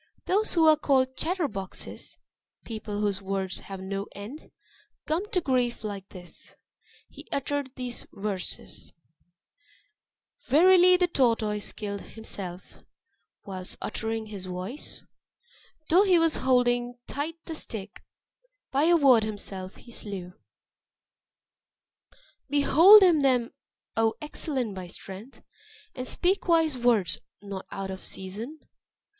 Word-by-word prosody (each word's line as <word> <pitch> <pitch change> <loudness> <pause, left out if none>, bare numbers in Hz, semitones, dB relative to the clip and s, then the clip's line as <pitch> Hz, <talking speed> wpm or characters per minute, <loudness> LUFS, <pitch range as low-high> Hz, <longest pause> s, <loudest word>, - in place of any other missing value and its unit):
those 415 +2 +1
who 330 -2 +5
are 310 - +8
called 260 -3 +2
chatter 340 +2 0
boxes 195 -6 -7 0.5
people 215 -2 -4
whose 200 -2 0
words 190 -1 -2
have 195 -1 -8
no 195 +1 -4
end 215 +10 -9 0.6
come 345 +7 -1
to 385 - +1
grief 250 -7 0
like 200 -2 -5
this," 180 -2 -12 0.5
he - - -14
uttered 280 0 -2
these 250 -1 -5
Verses: 195 -2 -6 1.5
"Verily 360 +5 +7
the 360 - +3
tortoise 230 -9 +1
killed 200 -2 -5
himself 190 -5 -8 0.7
Whilst 185 -2 -5
uttering 225 +1 -3
his 200 -3 -7
voice; 185 +10 -6 0.8
Though 355 +4 +6
he 380 -3 +5
was 330 -2 +3
holding 245 -1 +2
tight 300 +4 -4
the 325 - -5
stick, 210 -9 -6 0.7
By 280 +3 +3
a 340 +1 +6
word 265 -7 +6
himself 200 -3 -5
he 240 - -15
slew. 190 -5 -6 2.2
"Behold 330 +8 +8
him 340 -5 +5
then, 250 -3 +2 0.4
O 225 0 +2
excellent 280 -7 -2
by 185 -2 -7
strength! 195 +7 -11 0.5
And 255 0 -5
speak 375 +2 +1
wise 325 -4 +3
words, 235 -9 +2 0.2
not 200 -2 -7
out 195 -1 -5
of 190 - -8
season. 220 +11 -7
240 Hz, 120 wpm, -27 LUFS, 200-300 Hz, 2.2 s, are